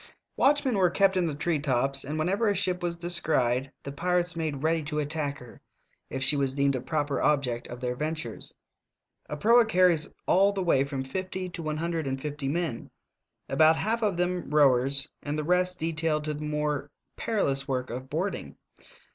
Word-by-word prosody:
Watchmen 270 -5 +3
were 180 -2 +4
kept 195 +2 +3
in 180 -2 +1
the 150 - -3
tree 155 +1 0
tops, 135 -1 +1
and 150 +3 -4
whenever 195 +8 +1
a 205 - +2
ship 185 -1 0
was 170 -1 -2
descried 155 -7 +1
the 140 - -6
pirates 175 +3 0
made 155 -4 -3
ready 160 +1 +2
to 150 0 -5
attack 145 -1 -2
her, 125 -1 -14 0.5
if 135 0 -2
she 150 - +5
was 135 -2 0
deemed 140 -1 +2
a 130 - -3
proper 145 +2 -1
object 135 -5 +1
of 120 - -8
their 125 -1 -2
ventures. 150 -4 -2 0.7
A 150 - -4
proa 235 +8 +5
carries 180 -7 +3 0.2
all 195 +2 +4
the 195 -2 -2
way 135 -6 +3
from 140 -1 -4
fifty 185 +5 -4
to 170 -1 -7
one 155 -1 -3
hun 170 +2 -2
dred 160 -4 -2
and 135 0 -2
fifty 145 0 -4
men, 160 -4 -2 0.6
about 160 0 +5
half 225 +6 -1
of 205 -5 0
them 180 0 -1
rowers 140 -2 +3
and 145 +1 -3
the 155 - -1
rest 180 +2 +1
detailed 160 -1 -1
to 150 0 -2
the 150 - -7
more 150 -1 -2 0.3
perilous 140 -11 -1
work 130 -3 -2
of 130 +2 -6
boarding. 180 +8 -3
155 Hz, 190 wpm, -27 LUFS, 140-180 Hz, 0.7 s, she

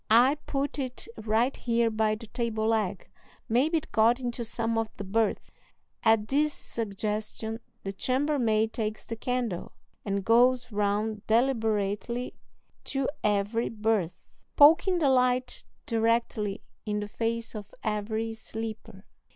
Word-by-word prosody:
"I 240 +5 +6
put 280 +1 -2
it 255 - -4
right 225 - +1
here 235 -1 +1
by 215 0 +1
the 225 +2 -10
table 225 -1 -2
leg; 210 -5 0 0.4
maybe 275 +9 +3
it 310 - -6
got 230 +3 +4
into 240 -1 -3
some 230 0 -1
of 225 0 +1
the 200 - -5
berths." 210 +2 0 0.5
At 220 -1 +3
this 295 +3 +2
suggestion 215 +1 -3 0.2
the 195 - -4
chambermaid 245 -2 +1
takes 215 -1 -3
the 230 - -5
candle, 240 -5 -2 0.3
and 200 -1 -2
goes 245 +2 +4
round 210 +1 -1
deliberately 225 -1 +1 0.5
to 270 -1 -1 0.2
every 210 +3 +1
berth, 210 -6 0 0.4
poking 330 +5 +6
the 300 -5 +3
light 255 -1 +1 0.2
directly 225 -2 0 0.2
in 210 -1 -1
the 205 - -4
face 230 +2 -2
of 210 -2 -8
every 220 +1 -1
sleeper. 225 0 -7
225 Hz, 130 wpm, -28 LUFS, 215-245 Hz, 0.5 s, I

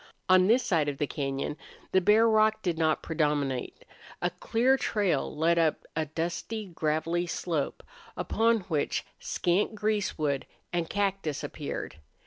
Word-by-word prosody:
On 185 0 +6
this 240 +4 +4
side 155 -5 +1
of 140 - -4
the 150 - +1
cañon 140 -1 -3 0.4
the 190 - +4
bare 215 +4 +5
rock 215 -1 +3
did 175 -3 0
not 160 -1 +1
predominate. 145 -5 -1 0.3
A - - 0
clear 250 +4 +2
trail 195 - 0
led 170 +2 +3
up 160 -2 +1
a 160 -1 -1
dusty, 170 +8 -3
gravelly 165 0 -1
slope, 165 -3 -2 0.3
upon 230 0 +2
which 160 -6 -1
scant 185 +5 0
greasewood 195 -10 -1 0.3
and 170 -2 -1
cactus 195 -7 -1
appeared. 145 - -5
170 Hz, 135 wpm, -28 LUFS, 150-205 Hz, 0.4 s, On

